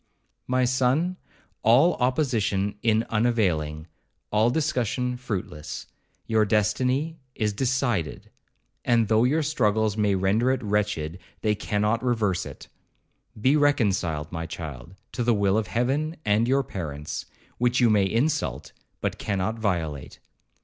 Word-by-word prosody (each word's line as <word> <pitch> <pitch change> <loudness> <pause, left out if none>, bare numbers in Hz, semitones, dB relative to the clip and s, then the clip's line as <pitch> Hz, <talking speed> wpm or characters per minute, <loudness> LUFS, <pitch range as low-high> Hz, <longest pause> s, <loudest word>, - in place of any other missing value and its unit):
'My 130 0 +2
son, 130 +8 +1 0.4
all 135 +10 +5
opposition 120 -7 +1
in 110 -1 +2
unavailing, 90 -10 +1 0.5
all 110 +2 +3
discussion 125 -4 0
fruitless. 100 -11 -5 0.4
Your 110 -1 +3
destiny 130 +9 +1 0.2
is 105 -2 0
decided, 120 - -1 0.5
and 115 -3 +2
though 110 +1 +4
your 155 +5 +2
struggles 110 -7 +1
may 105 -2 +2
render 100 +6 +2
it 130 -1 0
wretched, 100 -6 -1 0.2
they 105 -1 +2
cannot 105 +2 0
reverse 105 -7 0
it. - - -11 0.7
Be 130 +7 +4
reconciled, 95 - +1
my 85 -1 -4
child, 80 0 -8 0.2
to 125 - -2
the 120 -1 +3
will 100 -1 +2
of 110 -2 0
Heaven 140 +7 0
and 105 +3 +3
your 135 +2 +3
parents, 75 - -5 0.3
which 125 +1 +2
you 120 -3 +5
may 100 -2 +4
insult, 135 +9 -1 0.3
but - - -2
cannot 100 +2 -2
violate. 80 -9 -2
110 Hz, 130 wpm, -25 LUFS, 100-125 Hz, 0.7 s, all